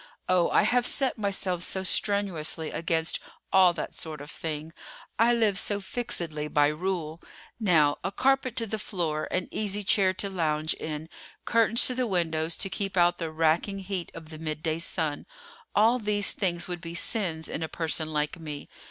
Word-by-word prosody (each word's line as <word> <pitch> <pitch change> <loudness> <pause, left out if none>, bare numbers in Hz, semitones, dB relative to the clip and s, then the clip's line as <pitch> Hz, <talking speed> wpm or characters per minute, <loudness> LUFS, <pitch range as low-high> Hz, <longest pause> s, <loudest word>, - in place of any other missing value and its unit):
Oh, 180 -2 +3
I - - +4
have 245 0 +2
set 265 -4 +2
myself 195 -3 -1
so 190 +1 +1
strenuously 185 -5 +1
against 165 -1 0 0.3
all 185 -2 +7
that 165 - -5
sort 155 -2 -3
of 145 +2 -9
thing. 155 0 -5 0.5
I 230 +1 +5
live 220 -4 +3
so 205 -1 0
fixedly 170 -8 -4
by 145 -1 +3
rule. 165 0 -3 0.4
Now, 160 -9 +3
a 190 - -2
carpet 260 +1 +1
to 230 - +1
the 220 0 -4
floor, 165 -7 -2
an 185 -1 -2
easy 205 -1 -2
chair 190 -1 +3
to 200 - -2
lounge 160 -4 -1
in, 155 0 -6 0.4
curtains 230 0 +4
to 255 - +3
the 250 -1 -1
windows 165 -4 0
to - - 0
keep 195 -2 -3
out 175 0 +4
the 165 -2 -3
racking 160 +5 +1
heat 190 -2 -4
of 160 -1 -10
the 155 -1 -9
midday 155 0 -3
sun—all 220 - -1
these 205 -2 +3
things 175 -4 -1
would 175 -2 -5
be 170 -1 -7
sins 170 -5 +1
in - - -4
a 160 - -1
person 160 -1 -2
like 150 +2 -1
me. 150 -3 -7
175 Hz, 175 wpm, -27 LUFS, 160-205 Hz, 0.5 s, all